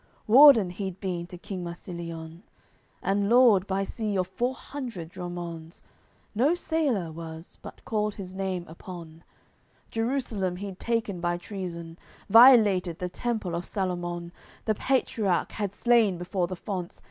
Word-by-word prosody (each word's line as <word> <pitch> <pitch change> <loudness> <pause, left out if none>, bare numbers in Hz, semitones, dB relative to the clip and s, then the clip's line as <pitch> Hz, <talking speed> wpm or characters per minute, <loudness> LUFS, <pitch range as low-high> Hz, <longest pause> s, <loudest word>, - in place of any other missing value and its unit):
Warden 235 -5 +8
he'd 190 0 -5
been 175 -3 -3
to 180 - -9
king 185 0 -6
Marsilion, 170 -1 -7 0.6
And 200 +1 +1
lord, 230 -6 +6
by 195 0 0
sea, 210 0 -3
of 185 - +1
four 245 +7 -1
hundred 240 - -7
dromonds; 175 -2 -7 0.5
No 270 +10 +3
sailor 285 - 0
was 160 +1 -9
but - - -11
called 210 -1 -1
his 185 -2 -8
name 190 -2 -3
upon; 165 -1 -10 0.7
Jerusalem 225 -6 -1
he'd 190 0 -7
taken 225 -6 -1
by 175 0 0
treason, 175 -3 -7 0.3
Violated 215 -8 +7
the 180 0 -3
Temple 215 -3 -3
of 170 +1 -2
Salomon, 175 -3 -3 0.3
The 220 - +2
Partiarch 215 -6 0
had 200 -2 -4
slain 230 -6 +3
before 175 +1 -1
the 185 - -5
fonts. 180 -1 -5
190 Hz, 135 wpm, -27 LUFS, 175-220 Hz, 0.7 s, Warden